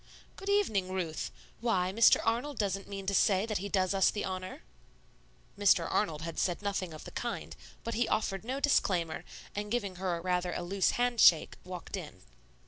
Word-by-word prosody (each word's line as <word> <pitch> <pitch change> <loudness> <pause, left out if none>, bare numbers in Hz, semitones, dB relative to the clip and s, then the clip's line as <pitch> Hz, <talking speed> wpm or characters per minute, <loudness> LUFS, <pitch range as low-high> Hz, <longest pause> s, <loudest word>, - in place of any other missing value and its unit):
"Good 390 - -6
evening, 215 - +1
Ruth; 175 -4 -3 0.3
why, 190 -6 +1
Mr. 230 +2 +6
Arnold 245 +5 0
doesn't 195 -2 -1
mean 195 -1 -6
to 200 - 0
say 195 0 +3
that 215 -4 -2
he 200 +2 -4
does 185 -1 +1
us 195 -1 +4
the 210 - -2
honor?" 185 0 -5 0.9
Mr. 205 -1 +4
Arnold 160 -7 0
had 165 0 -4
said 180 +2 0
nothing 195 -3 -2
of 155 - -9
the - - -9
kind; - - -4 0.3
but 230 - -3
he 235 +2 +1
offered 195 -2 -1
no 260 +4 -3
disclaimer, 180 - +1 0.3
and 210 +1 -3
giving 205 -5 -2
her 180 -2 -1
rather 180 0 -1
a - - -3
loose 190 +2 +1
hand 245 -1 +1
shake, 165 -3 +6
walked 180 +1 -7
in. 150 - -8
195 Hz, 185 wpm, -31 LUFS, 180-220 Hz, 0.9 s, Mr